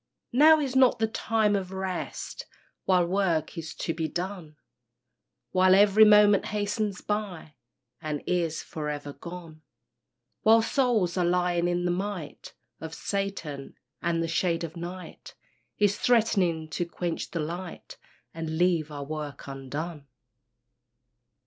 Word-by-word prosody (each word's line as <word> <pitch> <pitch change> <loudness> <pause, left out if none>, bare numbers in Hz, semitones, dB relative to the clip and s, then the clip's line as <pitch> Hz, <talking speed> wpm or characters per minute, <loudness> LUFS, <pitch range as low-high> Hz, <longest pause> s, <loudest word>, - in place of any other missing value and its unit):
Now 310 +5 +7
is 270 -3 -2
not 260 -2 +5
the 225 - +2
time 220 -1 +1
of 190 -2 -3
rest, 190 -1 -5 0.4
While 180 -2 +4
work 175 -4 0
is 160 -1 -6
to 165 - -2
be 160 -1 -2
done; 175 -1 -5 1.0
While 185 0 +5
every 205 +2 +7
moment 210 -1 +6
hastens 210 -1 -2
by, 205 -7 -4 0.5
And 150 -2 -4
is 170 -3 -1
for 150 -2 -5
ever 145 -1 -5
gone; 170 -2 -10 0.8
While 225 +1 +6
souls 225 -9 +1
are 180 - +2
lying 175 0 +1
in 175 0 0
the 175 - +2
might 185 -3 -5 0.2
Of 160 0 -7
Satan, 195 -9 -4 0.3
and 165 -1 0
the - - -1
shade 165 +1 0
of 165 0 -6
night 175 +2 -8 0.4
Is 205 -1 +2
threatening 195 -9 +2
to 175 - -2
quench 170 -1 -4
the 170 - -4
light 170 +3 -6 0.4
And 160 -1 -4
leave 170 -3 +2
our 145 -1 -5
work 150 -1 -6
undone. 140 +3 -6
175 Hz, 135 wpm, -27 LUFS, 160-205 Hz, 1.0 s, Now